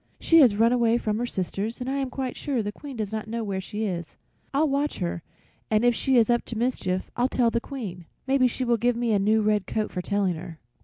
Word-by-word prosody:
"She 330 - +5
has 245 -9 +6
run 230 +2 +4
away 235 -1 +3
from 215 -2 -1
her 245 - -1
sisters, 200 +3 -3
and 250 - -5
I 270 +1 -1
am 270 -2 -1
quite 260 -1 -4
sure 265 -6 -1
the 205 - -3
Queen 275 +3 -9
does 215 -2 -3
not 220 0 -4
know 230 +1 -3
where 195 -2 -2
she 210 +3 -4
is. 175 -4 -4 0.3
I'll 295 +3 +2
watch 285 +1 0
her, 170 -2 -3 0.5
and 215 +2 +2
if 245 - +5
she 265 +2 +2
is 225 -2 +5
up 240 0 +2
to 230 - -6
mischief 205 -6 -1
I'll 245 +2 +1
tell 240 -3 +2
the 235 - 0
Queen. 200 - -7 0.2
Maybe 265 -1 +3
she 255 +1 -3
will 235 -1 +2
give 240 +2 +1
me 235 -1 0
a 205 - +3
new 215 +2 +3
red 210 -2 +1
coat 215 -1 -2
for 180 - -3
telling 200 -1 0
her." 165 0 -8
230 Hz, 255 wpm, -26 LUFS, 205-250 Hz, 0.5 s, has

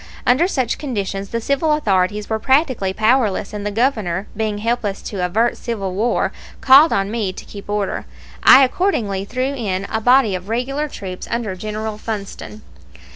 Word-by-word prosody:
Under 260 +8 +4
such 260 - -1
conditions 200 -7 -3
the 230 - -2
civil 280 +6 +1
authorities 205 -6 0
were 220 -1 -1
practically 260 - +2
powerless, 215 -1 +1
and 205 -1 -5
the 205 - -1
Governor, 210 -5 0
being 215 -1 -2
helpless 215 -2 -1
to 195 -4 -4
avert 220 +7 +1
civil 200 -6 -4
war, 225 +6 0 0.3
called 275 +5 +7
on 195 +1 0
me 215 -5 -1
to - - -10
keep 200 0 -11
order. 205 -2 -2 0.3
I 270 +1 +8
accordingly 235 - 0
threw 255 +5 -2
in 200 -7 -2
a 220 - -1
body 245 -2 +4
of 185 +2 -5
regular 270 +6 -1
troops 185 -9 -7
under 230 -5 -2
General 215 +2 -5
Funston. 215 0 -6
220 Hz, 165 wpm, -19 LUFS, 200-255 Hz, 0.3 s, I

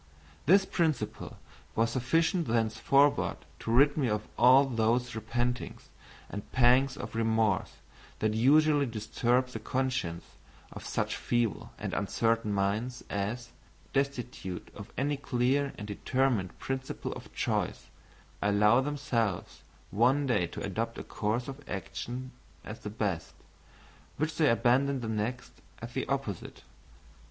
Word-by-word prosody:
This 195 +4 +6
principle 150 - -1 0.4
was 115 +1 +2
sufficient 165 +7 +1
thenceforward 120 +5 +2 0.2
to 115 - -3
rid 140 +4 +5
me 135 -6 +1
of 105 0 -2
all 130 +3 +7
those 120 0 +1
repentings 120 +2 -3 0.4
and 100 - -7
pangs 130 +2 +4
of - - -6
remorse 110 -3 +1 0.4
that 110 0 0
usually 145 +5 +4
disturb 120 +3 0
the 115 - -6
consciences 130 -8 -2 0.4
of - - -8
such - - -1
feeble 120 -3 -1
and - - -4
uncertain 115 -2 +1
minds 105 +5 -1
as, 110 +4 -2 0.4
destitute 125 -9 -2
of 100 0 -10
any 145 +2 0
clear 135 +1 +1
and 105 - -6
determinate 115 -2 0
principle 135 0 -4
of - - -10
choice, - - -2 0.5
allow 105 +4 +4
themselves 130 -9 -2 0.3
one 130 +7 +3
day 105 -9 +2
to - - -7
adopt - - -2
a - - -5
course 110 +4 -2
of 135 +1 -7
action 120 +7 -5 0.3
as 110 +1 -7
the 105 - -6
best, 100 -6 -3 0.8
which 155 +2 -1
they 155 -3 +4
abandon 130 +3 +3
the 115 - -4
next, 110 +3 -3 0.3
as - - -8
the - - -2
opposite. - - -4
120 Hz, 125 wpm, -30 LUFS, 110-135 Hz, 0.8 s, all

